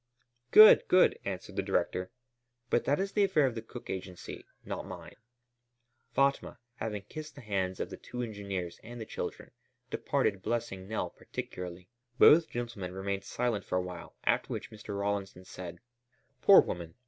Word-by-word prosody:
"Good, 215 - +9
good," 185 - +5
answered 95 -2 -5
the - - +3
director, 90 0 -1 0.6
"but - - +2
that 145 - +2
is 195 +1 -1
the 205 - +3
affair 180 -7 +4
of 130 - 0
the 115 - -5
Cook 120 +2 -10
Agency, 95 -1 -7 0.2
not - - -4
mine." - - -9 1.0
Fatma, 140 0 +1 0.2
having 105 -3 -4
kissed 155 +8 -8
the 140 - -10
hands 95 -4 -2
of - - -3
the - - -6
two 125 0 -6
engineers 100 -6 -5
and 120 +1 -9
the 110 - -5
children, - - -6 0.4
departed 95 - 0
blessing 105 -4 -3
Nell 110 +1 -2
particularly. 90 0 -7 0.3
Both 160 +4 +7
gentlemen 115 -7 -5
remained 100 0 -3
silent 120 -5 -1
for 90 - -1
a - - +2
while, 90 -2 -8
after - - +2
which - - -5
Mr. 105 -2 -7
Rawlinson 100 -2 -2
said: 90 -2 -8 0.6
"Poor 195 - +9
woman! 85 -2 -5
100 Hz, 160 wpm, -31 LUFS, 95-120 Hz, 1.0 s, Good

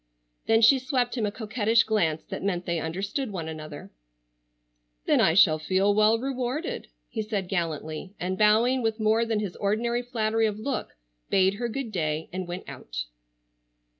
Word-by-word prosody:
Then 225 0 +4
she 265 +5 +7
swept 255 -2 -1
him 220 -4 0
a - - -2
coquettish 225 +1 +2
glance 170 -8 0
that - - -6
meant 180 -3 -1
they 170 -1 -1
understood 195 - -3
one 170 -5 -4
another. 155 -7 -8 1.1
"Then - - +4
I 160 - +4
shall 160 -5 +6
feel 190 +6 +2
well 215 +2 +4
rewarded," 270 - -3 0.2
he 220 - -4
said 210 -3 -3
gallantly, 165 0 -3
and 185 +1 -2
bowing 220 +6 +4
with 225 -1 -1
more 220 +2 +3
than 225 -2 0
his 200 -4 -4
ordinary 235 +4 0
flattery 225 -2 0
of 210 -1 -3
look 260 +4 -4 0.3
bade 190 0 +3
her 235 +4 -3
good 250 -1 -4
day 155 -4 -2
and 185 -1 -4
went 175 +2 -6
out. - - -6
210 Hz, 165 wpm, -26 LUFS, 180-230 Hz, 1.1 s, she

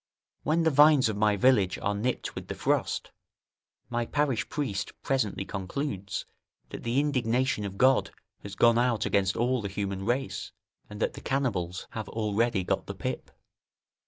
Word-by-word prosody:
When 165 +2 +1
the 160 - +3
vines 145 -3 +6
of 110 - -2
my 105 0 +3
village 100 -4 +3
are 100 - -1
nipped 115 +5 -2
with - - -7
the - - -4
frost, - - 0 0.8
my 120 -1 -2
parish 145 -5 0
priest 120 -10 -3
presently 105 -8 0
concludes, 100 +1 -4 0.4
that - - -7
the 120 +3 +1
indignation 130 -5 +1
of 100 -1 -6
God 130 +3 +4 0.3
has 100 -1 -8
gone 115 +3 +5
out 120 -3 +1
against 95 -2 +1
all 125 +1 +1
the 100 - -4
human 100 -1 -3
race, 125 +5 -2 0.4
and 105 - -8
that - - +1
the - - -9
cannibals 100 -11 -1
have 110 -3 -5
already 110 -1 0
got - - -1
the - - -5
pip. - - -4
115 Hz, 160 wpm, -28 LUFS, 100-130 Hz, 0.8 s, vines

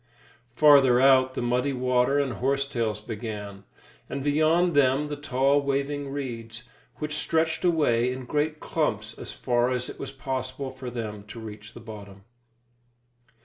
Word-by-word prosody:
Farther 140 -4 +6
out, 130 -1 +5
the - - -2
muddy 125 +3 +1
water 125 +1 +2
and 140 -3 0
horsetails 125 -4 -1
began, 105 -3 -7 0.4
and 140 - -4
beyond 155 +4 +3
them 140 +1 +3
the 145 - -3
tall, 140 0 +2
waving 140 0 -2
reeds, 120 -4 -6 0.3
which 150 -1 -4
stretched 160 +2 0
away 125 -9 +2
in 130 0 -6
great 150 +3 -1
clumps 110 -9 -2
as - - -7
far 120 -1 0
as 125 -1 -2
it - - -9
was 135 - -5
possible 130 0 -4
for 130 -1 -7
them 110 -4 -5
to 115 - -9
reach 105 0 -10
the - - -8
bottom. 100 -3 -11
130 Hz, 145 wpm, -26 LUFS, 115-145 Hz, 0.4 s, Farther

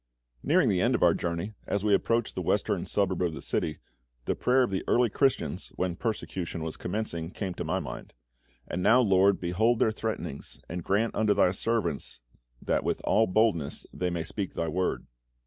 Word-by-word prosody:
Nearing - - +3
the - - +2
end - - +3
of - - +1
our - - +6
journey, 85 +5 -3
as 100 +1 -1
we 105 - +4
approached 115 +3 +1
the - - -3
western - - 0
suburb 95 -3 0
of 85 -3 0
the - - -6
city, 75 - -1 0.5
the - - +1
prayer 130 +1 +3
of 120 - -1
the 95 - -1
early 120 -2 +3
Christians, 95 - 0
when 90 -2 -1
persecution 90 -6 -3
was 80 -1 -4
commencing, 90 -4 -3
came 95 0 -4
to - - -5
my 90 +4 -1
mind: 80 - -7 0.5
"And 90 - -3
now, 120 +7 +5
LORD, 100 -2 +4
behold 110 +7 +2
their 110 - +3
threatenings, 110 -10 -5
and 85 0 -5
grant 105 +6 +1
unto 105 -2 +2
Thy 95 -2 +4
servants 95 - -2 0.4
that - - 0
with - - -1
all 110 +1 +3
boldness 95 -7 +1
they 90 - -1
may 85 -2 -2
speak 95 +4 -4
Thy 85 - -1
Word." 90 +3 -1
95 Hz, 190 wpm, -28 LUFS, 85-110 Hz, 0.5 s, our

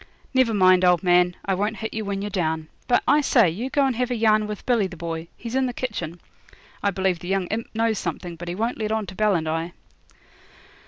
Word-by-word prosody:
Never 260 -3 +3
mind, 185 -1 +5
old 180 -1 +4
man, 180 0 +4
I 195 - +1
won't 205 +3 -1
hit 220 - -5
you 220 - -3
when 200 -1 -3
you're 205 - -4
down. 160 -4 -1 0.2
But, 245 - +3
I 295 +1 +5
say, 235 - +4
you 230 +10 -4
go 280 +1 +2
and 265 -3 0
have 250 0 0
a 250 - -1
yarn 215 -1 +3
with 210 -1 -6
Billy 235 -6 +2
the 180 -2 -11
Boy 165 0 -5
he's 230 0 -7
in 265 0 +2
the 245 - -4
kitchen. 175 -10 -4 0.6
I 200 - +2
believe 190 -2 0
the 175 - -9
young 190 0 0
imp 225 +2 -3
knows 225 -1 +1
something, 170 0 -4
but 175 +1 -9
he 175 - -3
won't 230 +5 -2
let 215 -1 -2
on 220 -1 0
to 185 - -9
Bell 210 0 +2
and 160 -2 -1
I.' 165 +2 -2
200 Hz, 245 wpm, -24 LUFS, 175-225 Hz, 0.6 s, mind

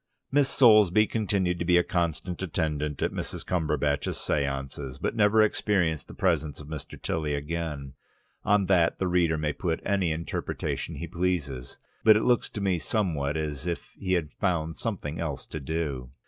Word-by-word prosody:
Miss 140 0 +3
Soulsby 110 -4 +6
continued 100 -5 0
to 85 - -1
be 90 0 +5
a 90 - +4
constant 85 +1 -2
attendant 75 -4 -1
at - - +1
Mrs. - - -5
Cumberbatch's 75 -4 0
séances, 70 -1 -2
but - - -2
never 110 0 +5
experienced 95 -7 +1
the - - -11
presence 80 -6 0
of 75 - -10
Mr. 75 -1 -7
Tilly 75 -2 -1
again. 75 -2 -4 0.5
On 105 -1 +3
that 90 -3 +3
the 95 - -1
reader 85 -3 +2
may 75 -1 -1
put 80 0 -2
any 95 -4 +1
interpretation 80 +2 -3
he 85 - -5
pleases. 85 -8 -2 0.3
It 110 -1 +8
looks 125 -1 +2
to 105 - -6
me 95 -3 +1
somewhat 80 -9 -1
as 75 0 -3
if 85 - -4
he 95 -1 -2
had 80 -5 0
found 80 -4 -1
something 85 -9 -3
else 75 -5 -3
to 80 - -6
do. 70 -4 -3
85 Hz, 165 wpm, -27 LUFS, 75-95 Hz, 0.5 s, It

